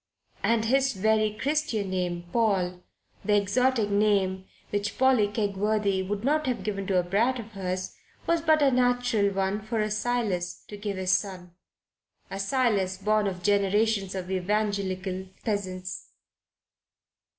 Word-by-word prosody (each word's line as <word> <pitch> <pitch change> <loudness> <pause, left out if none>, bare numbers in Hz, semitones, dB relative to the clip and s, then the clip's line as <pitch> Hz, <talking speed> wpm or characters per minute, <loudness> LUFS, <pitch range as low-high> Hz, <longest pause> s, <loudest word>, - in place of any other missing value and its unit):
And 230 -1 +2
his 270 +3 +2
very 215 +2 +2
Christian 275 -9 -1
name 175 -2 -2
Paul 190 -6 +1 0.4
the 210 - +2
exotic 220 +2 +1
name 200 -2 +2 0.3
which 205 0 -2
Polly 260 -5 +4
Kegworthy 205 -1 0
would 200 +2 -3
not 300 +2 +1
have 250 - -1
given 195 -2 -3
to 190 - +2
a - - +1
brat 220 +8 +1
of 225 -2 -8
hers 185 -2 -4 0.3
was 335 -1 +2
but 315 -2 +4
a 275 - +5
natural 245 -5 +2
one 195 +2 -1
for 220 +2 -3
a 215 0 0
Silas 215 -5 -1
to 210 - -7
give 205 -1 -4
his 185 0 0
son, 185 -3 -1 0.8
a 195 - -4
Silas 200 -4 +1
born 210 +1 +1
of 180 -2 -4
generations 200 0 +2
of 185 0 -5
evangelical 190 -1 -1 0.2
peasants. 185 -4 -3
205 Hz, 140 wpm, -27 LUFS, 190-225 Hz, 0.8 s, a